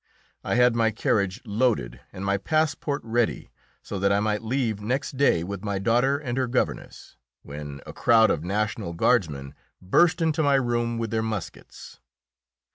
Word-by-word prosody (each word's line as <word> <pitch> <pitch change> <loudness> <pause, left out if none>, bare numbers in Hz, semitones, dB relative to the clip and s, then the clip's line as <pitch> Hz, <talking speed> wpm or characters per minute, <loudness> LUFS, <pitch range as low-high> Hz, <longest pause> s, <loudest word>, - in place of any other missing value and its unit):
I - - -1
had 125 -1 +4
my 115 -1 +3
carriage 100 -1 0
loaded, 105 - 0
and 95 +1 -7
my 100 0 +1
passport 150 +3 -1
ready, 115 0 -1 0.3
so 100 - -5
that 100 +1 +2
I 100 - +3
might 105 0 0
leave 115 -3 -1
next 130 +6 -2
day 130 -11 +3
with 100 +2 -6
my 100 -2 -2
daughter 120 +7 +2
and 130 -3 -3
her 130 - 0
governess, 125 +1 -3 0.3
when 70 -1 -8
a - - -9
crowd 110 -1 +4
of 75 - -2
national 105 -1 -2
guardsmen 80 - 0 0.3
burst 160 - +3
into 160 -1 +1
my 140 -2 +3
room 120 -2 0
with 115 -2 -3
their 110 - 0
muskets. 110 -5 -7
110 Hz, 165 wpm, -25 LUFS, 100-125 Hz, 0.3 s, had